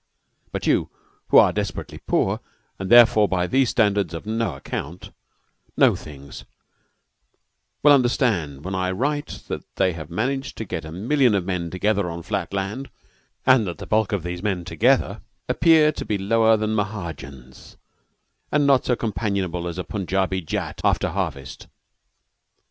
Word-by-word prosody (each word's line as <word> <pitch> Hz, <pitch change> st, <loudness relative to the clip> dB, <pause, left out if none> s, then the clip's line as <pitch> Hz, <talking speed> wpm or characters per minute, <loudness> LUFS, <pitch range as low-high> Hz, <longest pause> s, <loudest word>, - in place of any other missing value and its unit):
But -, -, -4 dB
you, -, -, +2 dB, 0.4 s
who -, -, +5 dB
are -, -, +6 dB
desperately -, -, -4 dB
poor, -, -, 0 dB, 0.4 s
and 95 Hz, 0 st, -4 dB
therefore 120 Hz, -3 st, +7 dB
by 90 Hz, -2 st, 0 dB
these 130 Hz, +5 st, +2 dB
standards 100 Hz, -6 st, +1 dB
of 80 Hz, -, -7 dB
no 110 Hz, -6 st, -1 dB
ac 70 Hz, -, -13 dB
count, 85 Hz, +6 st, -6 dB, 0.7 s
know -, -, +5 dB
things, 70 Hz, -2 st, -10 dB, 1.4 s
will 145 Hz, -, +7 dB
understand 110 Hz, -, +1 dB
when 95 Hz, -, -4 dB
I 95 Hz, -1 st, -1 dB
write 145 Hz, +10 st, -2 dB
that -, -, -4 dB
they 95 Hz, -2 st, +2 dB
have 80 Hz, -2 st, -8 dB
managed 135 Hz, +9 st, -2 dB
to 110 Hz, -, -4 dB
get 85 Hz, -5 st, -5 dB
a 80 Hz, -, -8 dB
million 120 Hz, -, +2 dB
of 95 Hz, -3 st, -1 dB
men 90 Hz, -3 st, -2 dB
together 100 Hz, +1 st, 0 dB
on 85 Hz, 0 st, -6 dB
flat -, -, -3 dB
land, 100 Hz, +7 st, -4 dB, 0.6 s
and 125 Hz, -5 st, +5 dB
that 85 Hz, -, -5 dB
the 100 Hz, -, -8 dB
bulk 110 Hz, +2 st, +1 dB
of 100 Hz, -5 st, -1 dB
these 90 Hz, 0 st, -5 dB
men 95 Hz, -4 st, -2 dB
together -, -, +1 dB, 0.3 s
appear 160 Hz, -2 st, +4 dB
to -, -, -6 dB
be 105 Hz, -, -1 dB
lower 110 Hz, +3 st, +3 dB
than 110 Hz, 0 st, -1 dB
Mahajans 80 Hz, -, -6 dB, 0.7 s
and 150 Hz, -1 st, +2 dB
not 135 Hz, -2 st, +4 dB
so 125 Hz, -, +2 dB
companionable 100 Hz, -6 st, -2 dB
as 85 Hz, 0 st, -5 dB
a 90 Hz, -, -3 dB
Punjabi 95 Hz, -1 st, -1 dB
Jat 80 Hz, -, -4 dB
after -, -, +2 dB
harvest. 70 Hz, -2 st, -5 dB
100 Hz, 160 wpm, -23 LUFS, 90-115 Hz, 1.4 s, therefore